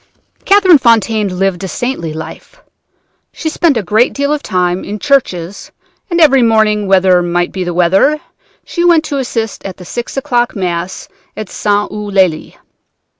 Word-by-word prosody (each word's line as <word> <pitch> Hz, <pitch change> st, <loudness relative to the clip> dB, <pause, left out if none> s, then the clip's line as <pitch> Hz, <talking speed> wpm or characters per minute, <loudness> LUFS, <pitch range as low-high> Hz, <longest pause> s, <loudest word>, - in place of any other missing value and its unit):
"Catherine 380 Hz, -6 st, +5 dB
Fontaine 220 Hz, -5 st, +1 dB
lived 195 Hz, -1 st, -1 dB
a -, -, -3 dB
saintly 190 Hz, -7 st, -4 dB
life. 160 Hz, -, -9 dB, 0.7 s
She 320 Hz, -, -4 dB
spent 315 Hz, -4 st, +1 dB
a 220 Hz, -, -1 dB
great 215 Hz, +7 st, +2 dB
deal 280 Hz, +1 st, -1 dB
of 300 Hz, -, -2 dB
time 180 Hz, -3 st, -1 dB
in 210 Hz, -, -5 dB
churches, 205 Hz, -, -1 dB, 0.4 s
and 345 Hz, -1 st, 0 dB
every 275 Hz, -5 st, +5 dB
morning, 215 Hz, -3 st, +2 dB
whatever 185 Hz, -2 st, +4 dB
might 175 Hz, 0 st, -1 dB
be 185 Hz, -, -4 dB
the 175 Hz, -, -3 dB
weather, 185 Hz, -, +2 dB, 0.5 s
she 345 Hz, -, -3 dB
went 340 Hz, -2 st, +4 dB
to 285 Hz, -2 st, -3 dB
assist 230 Hz, -4 st, -4 dB
at 190 Hz, -2 st, -7 dB
the 180 Hz, -, -12 dB
six 240 Hz, +8 st, -6 dB
o'clock 245 Hz, -3 st, 0 dB
Mass 180 Hz, -1 st, -4 dB, 0.3 s
at 215 Hz, -3 st, -6 dB
St. 205 Hz, 0 st, -1 dB
Eulalie. 195 Hz, -6 st, -1 dB
210 Hz, 160 wpm, -13 LUFS, 185-270 Hz, 0.7 s, Catherine